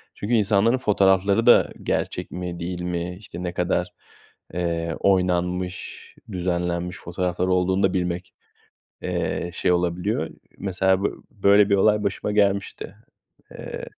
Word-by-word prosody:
Çünkü 105 +4 -3
insanların 110 +2 +3
fotoğrafları 100 -2 +3
da 120 - +6
gerçek - - -2
mi 90 -1 -5
değil 90 +1 -4
mi, 90 0 -3
işte, 90 -4 -8
ne 90 -1 -3
kadar, 90 0 -1 0.6
eee, 85 -1 -2
oynanmış, 90 -1 0 0.2
düzenlenmiş 90 -1 -2
fotoğraflar 90 +1 -2
olduğunu 95 +1 +2
da 95 - +3
bilmek, 90 0 -2 0.7
eee, 85 - -2
şey 90 - +1
olabiliyor. 90 -1 0 0.3
Mesela 95 0 +1
b - - +4 0.2
böyle 100 0 +4
bir 100 - +5
olay 105 +2 +3
başıma 100 +1 -2
gelmişti. 100 -1 0 0.6
Eee - - -7
90 Hz, 125 wpm, -24 LUFS, 90-100 Hz, 0.7 s, da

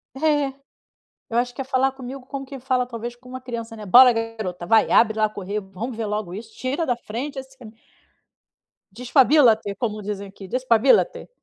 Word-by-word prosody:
É. 290 -1 +1 0.8
Eu 235 - 0
acho 245 0 -1
que - - -7
é - - -10
falar 265 0 +1
comigo 265 0 -8
como 275 0 -6
quem 270 -1 -9
fala 255 -1 0
talvez 240 0 -6
com 250 +1 -17
uma 255 0 -7
criança, 235 -3 -6
né? 215 -1 -9
"Bora 250 +6 +8
garota, 220 -6 -4
vai. 220 +3 +4
Abre 220 -1 +4
lá. 215 0 +3
Correr. 205 0 -4
Vamos 205 +5 -7
ver 230 - -3
logo 210 -4 -3
isso. 220 +3 -9
Tira 270 +6 -2
da 245 -5 0
frente 265 +6 -6
assim". 265 -4 -11 1.2
Despabílate, 245 -2 +3
como 215 -3 -3
dizem 200 -1 -5
aqui. 195 0 -12
Despabílate. 255 - +2
240 Hz, 180 wpm, -23 LUFS, 215-260 Hz, 1.2 s, Bora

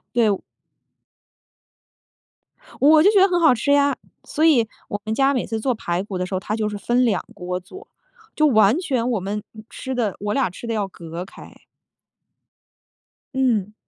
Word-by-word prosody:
对， 230 -3 +4
我 195 - 0 2.4
我 305 +2 +6
就 405 - +6
觉 410 - +4
得 390 - +6
很 350 -1 +1
好 315 -6 +5
吃 265 +5 -1
呀， 285 0 +3 0.3
所 310 - -2
以 245 -9 +4 0.2
我 205 - -3
们 220 - -2
家 275 +3 +2
每 255 - -1
次 225 -1 -3
做 255 +3 0
排 175 -3 -2
骨 195 -3 -5
的 180 - -2
时 185 - -8
候 185 - 0
他 210 +3 -3
就 215 -1 -1
是 210 - -5
分 240 +5 +1
两 210 -6 0
锅 180 -1 -4
做。 380 - -13 0.5
就 305 - +4
完 220 0 +4
全 255 -8 -1
我 225 - 0
们 205 +2 -3 0.3
吃 260 -1 -6
的 215 -6 0
我 205 +1 -2
俩 255 -6 +1
吃 235 +6 -10
的 230 - -2
要 210 -2 -1
隔 170 -1 -8
开。 190 - -14 1.8
嗯。 225 -6 0
225 Hz, 195 characters per minute, -22 LUFS, 200-270 Hz, 2.4 s, 我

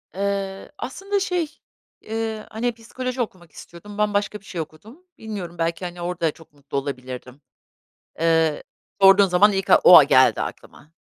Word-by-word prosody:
Eee, 195 0 -3
aslında 395 +10 -3
şey, 350 -5 -2 0.5
ııı, 220 -1 -3
hani, 240 +3 -2
psikoloji 250 +2 -5
okumak 180 -7 -6
istiyordum. 205 +7 -12
Ben 210 0 +1
başka 205 +1 -1
bir 200 - -24
şey 175 -5 -5
okudum. 215 - -12
Bilmiyorum 195 -6 -7
belki, 165 +2 -2
hani, 175 0 -7
orada 170 -2 -1
çok 160 -1 -19
mutlu 140 -1 -7
olabilirdim. 130 -1 -6 0.8
Iıı, 160 -2 +2 0.4
sorduğun 195 +1 +7
zaman 190 +3 +4
ilk 195 0 -2
ak - - +7
o - - +11
a - - +9
geldi - - +4
aklıma. 155 - -9
195 Hz, 155 wpm, -22 LUFS, 165-220 Hz, 0.8 s, o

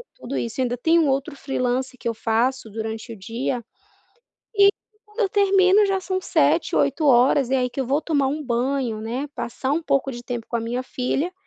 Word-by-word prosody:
tudo 265 +3 -5
isso, 235 +3 -3
ainda 245 -1 -1
tem 325 +7 +3
um 310 - +3
outro 275 +3 -1
freelancer 255 -1 -2
que - - -5
eu 230 - 0
faço, 230 +2 0
durante 220 +2 -5
o - - -9
dia, 235 +5 -3 0.9
e 400 -1 +7 0.4
quando 420 +3 -8
eu 400 - +3
termino 395 0 +4
já 385 -1 0
são 375 0 -2
19:00 - - +2
20:00 265 -3 +3
e - - +2
aí 250 -1 +1
que 270 - -4
eu 260 - -2
vou 280 +4 +1
tomar 285 -5 +1
um 300 +2 -3
banho, 245 -2 -1
né, 245 +6 -3
passar 260 +3 -3
um 330 +2 0
pouco 275 -2 0
de 240 0 -8
tempo 240 -2 -5
com 235 - -1
a - - -2
minha 240 +3 -3
filha, 270 +7 -2
260 Hz, 205 wpm, -23 LUFS, 240-305 Hz, 0.9 s, e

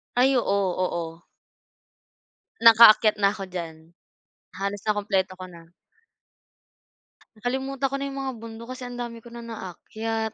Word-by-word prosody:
Ay, 265 +2 +4
oo, 200 -4 +1 0.2
oo. 165 -1 -5 1.4
Nakaakyat 225 -1 +8
na'ko 200 -1 +1
diyan. 165 -2 -8 0.6
Halos 200 +1 -3
nakumpleto 195 -3 0
ko 185 0 -8
na. 165 -1 -15 1.7
Nakalimutan 265 +3 -2
ko 275 - -3
na 275 - -3
'yung 275 - -6
mga 265 -1 -3
bundok 230 0 -9
kasi 255 - -9
ang 245 0 -7
dami 235 -1 -5
ko 235 - -13
na 235 0 -9
naakyat. 220 +2 -5
220 Hz, 130 wpm, -25 LUFS, 190-240 Hz, 1.7 s, Nakaakyat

